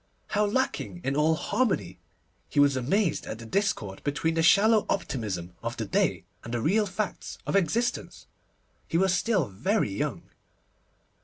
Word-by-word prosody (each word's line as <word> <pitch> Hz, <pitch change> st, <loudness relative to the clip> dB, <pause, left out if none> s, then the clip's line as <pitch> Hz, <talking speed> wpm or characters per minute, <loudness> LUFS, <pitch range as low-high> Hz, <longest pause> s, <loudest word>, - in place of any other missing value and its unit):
How 210 Hz, 0 st, +2 dB
lacking 210 Hz, -6 st, -1 dB
in 135 Hz, +1 st, -1 dB
all 155 Hz, +2 st, +3 dB
harmony! 155 Hz, -, -1 dB, 0.5 s
He -, -, 0 dB
was 140 Hz, -1 st, +5 dB
amazed 160 Hz, -, 0 dB
at -, -, -5 dB
the 115 Hz, -, -10 dB
discord 115 Hz, -, -1 dB
between 150 Hz, +3 st, 0 dB
the 165 Hz, -, +1 dB
shallow 210 Hz, +6 st, +5 dB
optimism 100 Hz, -, -2 dB
of -, -, -4 dB
the -, -, -2 dB
day, -, -, +1 dB, 0.2 s
and 115 Hz, -, -7 dB
the -, -, 0 dB
real 205 Hz, -, +2 dB
facts 200 Hz, +1 st, -4 dB
of -, -, -1 dB
existence. 230 Hz, -, 0 dB, 0.6 s
He 165 Hz, -, 0 dB
was 190 Hz, 0 st, +3 dB
still 190 Hz, -, +1 dB
very 125 Hz, -, 0 dB
young. 95 Hz, -, -3 dB
165 Hz, 155 wpm, -27 LUFS, -, 0.6 s, was